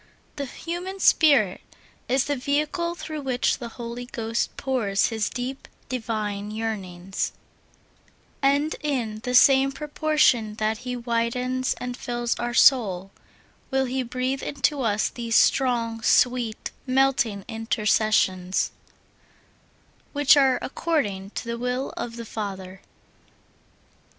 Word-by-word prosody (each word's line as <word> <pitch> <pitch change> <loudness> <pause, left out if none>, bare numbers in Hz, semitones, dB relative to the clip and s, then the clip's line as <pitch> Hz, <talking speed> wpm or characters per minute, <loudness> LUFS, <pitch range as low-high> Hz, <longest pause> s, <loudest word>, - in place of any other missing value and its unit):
The 280 -2 -4
human 350 +7 -6
spirit 275 - +4 0.5
is 260 0 +2
the 290 - 0
vehicle 300 +6 -1
through 310 -2 -6
which 255 -2 0
the 240 - -5
Holy 240 0 -6
Ghost 230 -1 -3
pours 230 -8 +1
His 220 -2 -1
deep, 255 +2 -5 0.2
divine 215 -4 -3
yearnings, 195 -4 -4 1.1
and 285 +3 +2
in 245 -8 -2
the 250 +2 -2
same 270 +1 +6
proportion 295 -6 +1
that 220 0 -1
He 250 0 -4
widens 245 +2 -1
and 250 0 -5
fills 240 -1 -2
our 240 0 -2
souls, 195 -10 +4 0.6
will 265 -1 +1
He 260 +1 -1
breathe 255 +2 -2
into 280 +1 0
us 215 -3 +1
these 230 -2 -3
strong, 235 -4 +2
sweet, 240 -1 +2 0.2
melting 255 -6 +2
in 225 0 -6
tercessions, 210 -4 +1 1.4
which 290 0 +6
are 265 -3 +4
according 215 - -1
to - - -4
the 235 0 -4
will 250 +2 -2
of 230 -1 -5
the 235 0 -7
Father. 195 -3 -6
245 Hz, 120 wpm, -25 LUFS, 220-270 Hz, 1.4 s, same